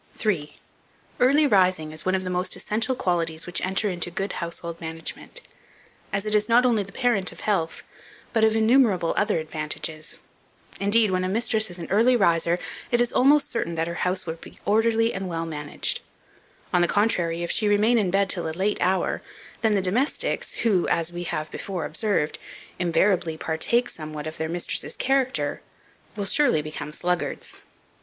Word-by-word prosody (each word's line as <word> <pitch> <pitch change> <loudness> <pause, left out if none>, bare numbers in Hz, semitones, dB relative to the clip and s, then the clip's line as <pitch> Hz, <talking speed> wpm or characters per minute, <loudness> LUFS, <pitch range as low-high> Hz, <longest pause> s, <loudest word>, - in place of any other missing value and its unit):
3. 155 -9 -1 0.6
EARLY 280 +5 +5
RISING 185 - +3
IS 155 0 -6
ONE 185 - +3
OF 185 - -1
THE 185 - -3
MOST 180 +1 0
ESSENTIAL 225 +5 -1
QUALITIES 165 -5 -1
which 175 - -2
enter 190 +3 0
into 175 -2 -2
good 195 +3 -3
Household 170 0 -6
Management, 165 - -5 0.7
as 195 +1 -1
it 215 - -1
is 210 +1 +2
not 240 +2 +5
only 235 -4 +3
the 200 0 -7
parent 215 -9 +1
of - - -11
health, 180 -6 -1 0.5
but 225 -2 +2
of 220 0 +4
innumerable 220 -6 +3
other 205 -3 +2
advantages. 155 0 -4 0.6
Indeed, 205 +1 +3
when 185 0 +1
a 185 - -1
mistress 220 +1 +1
is 175 - -4
an 170 - -6
early 230 +5 +5
riser, 170 -5 +3 0.3
it 240 - +2
is 240 0 +1
almost 285 +2 +4
certain 170 -8 -2
that 165 0 -1
her 170 - -3
house 185 +1 0
will 160 - -3
be 165 - -13
orderly 225 +2 +2
and 195 -1 -4
well 165 -1 -2
managed. 150 -2 -2 0.7
On 180 - +4
the 175 - +4
contrary, 175 -5 +1
if 170 - -2
she 215 - +2
remain 215 +3 +4
in 195 -4 +1
bed 195 +2 +2
till 175 -3 0
a 160 - -6
late 200 +2 0
hour, 185 +1 +1 0.4
then 220 -2 +3
the 195 - +1
domestics, 235 +10 0
who, 195 -6 +3
as 165 0 0
we 175 0 -5
have 155 -2 -3
before 180 -6 -4
observed, 160 -1 -1 0.4
invariably 175 -1 +2
partake 235 +11 +1
somewhat 155 -4 -6
of 155 0 -6
their 160 0 -2
mistress's 175 +1 0
character, 265 0 0 0.5
will 205 - -3
surely 195 - +2
become 150 -1 -6
sluggards. 180 +3 -2
185 Hz, 180 wpm, -25 LUFS, 165-220 Hz, 0.7 s, EARLY